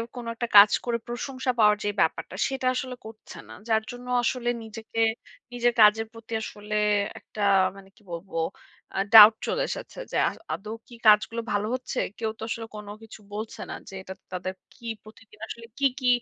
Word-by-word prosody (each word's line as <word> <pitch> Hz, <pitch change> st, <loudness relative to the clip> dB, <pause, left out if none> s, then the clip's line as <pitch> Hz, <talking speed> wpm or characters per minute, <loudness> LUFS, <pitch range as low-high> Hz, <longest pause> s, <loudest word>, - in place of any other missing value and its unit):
কোন 245 Hz, -1 st, -6 dB
একটা 240 Hz, +1 st, -3 dB
কাজ 205 Hz, +1 st, +10 dB
করে 240 Hz, -1 st, 0 dB
প্রশংসা 255 Hz, +2 st, -2 dB
পাওয়ার 210 Hz, -1 st, +6 dB
যে -, -, +2 dB
ব্যাপারটা, 160 Hz, -, -1 dB
সেটা 265 Hz, -1 st, -2 dB
আসলে 255 Hz, -1 st, -3 dB
করছে 220 Hz, 0 st, -11 dB
না। -, -, -9 dB, 0.2 s
যার 220 Hz, -1 st, +3 dB
জন্য 245 Hz, 0 st, -10 dB, 0.2 s
আসলে 240 Hz, 0 st, 0 dB
নিজেকে 225 Hz, +1 st, -7 dB, 0.5 s
নিজের 240 Hz, 0 st, +2 dB
কাজের 215 Hz, +1 st, +6 dB
প্রতি 230 Hz, 0 st, -10 dB
আসলে 210 Hz, -1 st, -6 dB, 0.4 s
একটা 210 Hz, -, -9 dB, 0.4 s
মানে 195 Hz, -1 st, -14 dB
কি -, -, -24 dB
বলবো 170 Hz, +3 st, -8 dB, 0.6 s
আ -, -, +2 dB
ডাউট 215 Hz, 0 st, +12 dB
চলে -, -, 0 dB
এসেছে। -, -, -6 dB
যে -, -, -1 dB
আ -, -, -7 dB, 0.2 s
আদৌ 210 Hz, +2 st, -6 dB, 0.2 s
কি 240 Hz, -, -13 dB
কাজগুলো 220 Hz, +2 st, +5 dB
ভালো 205 Hz, +1 st, 0 dB
হচ্ছে? 255 Hz, 0 st, -4 dB, 0.2 s
কেউ 220 Hz, -1 st, -2 dB
তো -, -, -6 dB
আসলে 225 Hz, 0 st, -3 dB
কোন 210 Hz, -1 st, -8 dB, 0.2 s
কিছু 220 Hz, -, -12 dB
বলছে 215 Hz, +1 st, -6 dB
না -, -, -4 dB, 0.2 s
যে, -, -, -12 dB
"এটা 190 Hz, -, -7 dB
ত -, -, -46 dB
তাদের 185 Hz, +1 st, -3 dB, 0.2 s
কি 240 Hz, -, -17 dB, 0.2 s
প্রতিদিন 215 Hz, 0 st, -17 dB
আসলে 230 Hz, 0 st, -8 dB
কী, 280 Hz, -, +2 dB
কী 255 Hz, -, -1 dB
225 Hz, 190 wpm, -26 LUFS, 210-240 Hz, 0.6 s, ডাউট